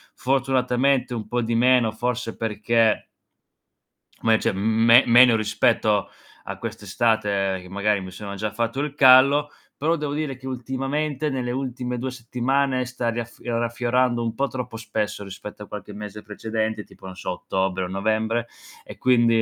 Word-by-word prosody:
fortunatamente, 130 0 +1
un 110 -2 -5
po' 120 0 -1
di 115 0 -2
meno, 120 -1 +4
forse 120 0 -3
perché 110 0 +1 1.2
me 115 -1 +4
cioè, - - 0
mhmm, 110 +3 +1
me 115 +2 +8
meno 120 0 +7
rispetto 105 -1 +1 0.4
a - - -4
quest'estate, 100 -4 -1
che 90 - -13
magari 100 +1 +1
mi 95 - -7
sono 100 +1 -7
già 105 +1 -3
fatto 115 +4 -2
il 145 0 -3
callo, 140 +2 +6 0.3
però 160 +4 +1
devo 150 -2 -3
dire 150 -4 -3
che 130 +1 -10
ultimamente, 135 +4 -2
nelle 125 -3 -2
ultime 125 -1 -3
2 130 +1 -3
settimane, 130 +2 -1
sta 120 -2 -2
raffio 120 0 -4
raffiorando 120 +1 0
un 115 - -2
po' 140 +4 0
troppo 125 -4 -6
spesso 105 -2 -3
rispetto 105 +2 -9
a - - -12
qualche 105 0 -8
mese 105 0 -8
precedente, 110 0 -3
tipo - - -17
non 95 - -8
so 90 - -4
ottobre 95 +1 -2
o - - -3
novembre 110 +4 -1 0.4
e - - -11
quindi, 120 -3 +3
115 Hz, 160 wpm, -23 LUFS, 105-130 Hz, 1.2 s, me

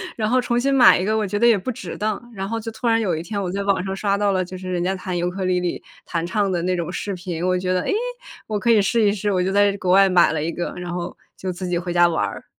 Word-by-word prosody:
然 215 -1 -1
后 255 +1 +3
重 240 -1 0
新 275 +3 +1
买 260 -2 +7
一 180 - -1
个 215 +2 +1
我 215 - 0
觉 205 +2 -2
得 235 - +3
也 230 -3 +6
不 190 - -5
值 185 -7 -7
当。 215 +3 -3
然 195 -2 -4
后 230 +2 -2
就 225 +1 -6
突 220 +2 -4
然 225 0 +3
有 185 -6 0
一 160 - -4
天 200 +4 -4
我 180 -2 -3
在 200 - -2
网 195 -2 +1
上 190 0 -3
刷 200 0 0
到 205 -1 +1
了， 185 -1 0
就 185 +1 -8
是 185 0 -6
人 175 -1 -1
家 190 +2 0
弹 180 -1 -4
尤 175 +1 0
克 190 +1 -5
里 180 -1 +1
里， 180 -1 -3 0.2
弹 170 -1 -2
唱 200 +2 0
的 175 -2 -1
那 180 +1 0
种 170 -1 -3
视 195 +2 -4
频， 175 -1 -4
我 185 0 +1
觉 185 0 -1
得， 180 - +1
诶， - - -1 0.5
我 215 -1 -1
可 235 +3 +2
以 215 -3 +5
试 230 +4 +1
一 200 - +4
试。 205 0 -1
我 180 -1 +1
就 190 - -1
在 200 0 +3
国 185 -2 -1
外 195 +1 +6
买 180 -2 +4
了 160 - -2
一 160 - -1
个， 175 - -4
然 175 -1 -5
后 175 0 -5 0.2
就 185 -1 -4
自 180 +1 -5
己 175 - 0
回 175 +1 -4
家 175 0 +5
玩 160 -11 0
儿。 100 - -7
190 Hz, 350 characters per minute, -22 LUFS, 180-210 Hz, 0.5 s, 买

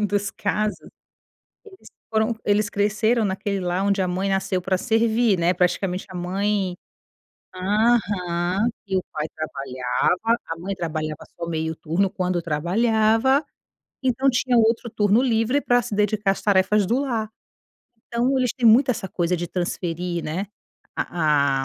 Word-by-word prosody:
do 210 - +1
dos 205 0 -1
casos, 210 +1 -2 0.8
eles 380 -3 -15 0.2
foram 220 +1 +1
eles 205 0 +2
cresceram 215 +3 +1
naquele 200 0 -2
lar 180 +1 -1
onde 200 -1 +2
a 185 - -1
mãe 185 +2 -1
nasceu 195 -1 0
pra 185 +1 0
servir, 225 -1 +2
né. 170 +2 +2
Praticamente 180 +1 0
a - - -10
mãe 190 +1 -1 0.8
aham, 195 -2 +1 0.2
e 190 -1 0
o 185 - -1
pai 155 0 -2
trabalhava, 140 - -1
a 165 - -4
mãe 185 +4 -4
trabalhava 155 -3 -4
só 170 - -4
meio 160 -1 -2
turno, 165 +5 0
quando 180 -1 -1
trabalhava, 220 - +2 0.6
então 260 +1 +2
tinha 245 0 +2
outro 230 +1 +2
turno 210 +1 +3
livre 245 +2 +1
pra 245 0 +3
se 215 - -5
dedicar 210 -1 +1
às 195 - -4
tarefas 200 0 +3
do 240 +7 +1
lar. 230 -6 -2 0.8
Então 245 +3 +1
eles 250 -2 +1
têm 245 -3 +2
muito 255 +4 +6
essa 230 -5 -4
coisa 175 -1 0
de 175 0 -4
transferir, 175 -1 -3
né, 170 +6 -3 0.5
a 140 -5 +1
200 Hz, 150 wpm, -23 LUFS, 175-225 Hz, 0.8 s, muito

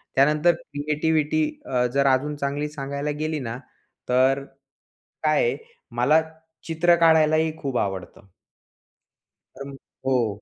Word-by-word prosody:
त्यानंतर 150 +5 +4
क्रिएटिव्हिटी 155 - -1 0.2
अ, 125 -1 0
जर 140 0 +2
अजून 135 +3 +1
चांगली 145 +1 -3
सांगायला 140 0 -4
गेली 155 0 -2
ना, 120 -2 -5 0.5
तर 130 +2 +3 0.8
काय - - +3
आहे, 475 - 0 0.3
मला 135 +7 +3 0.5
चित्र 170 +1 +3
काढायलाही 160 -1 +3
खूप 135 -5 -3
आवडतं. 95 -1 -4 1.3
पण 140 +1 -8 0.3
हो. 115 -6 0
145 Hz, 110 wpm, -24 LUFS, 130-155 Hz, 1.3 s, त्यानंतर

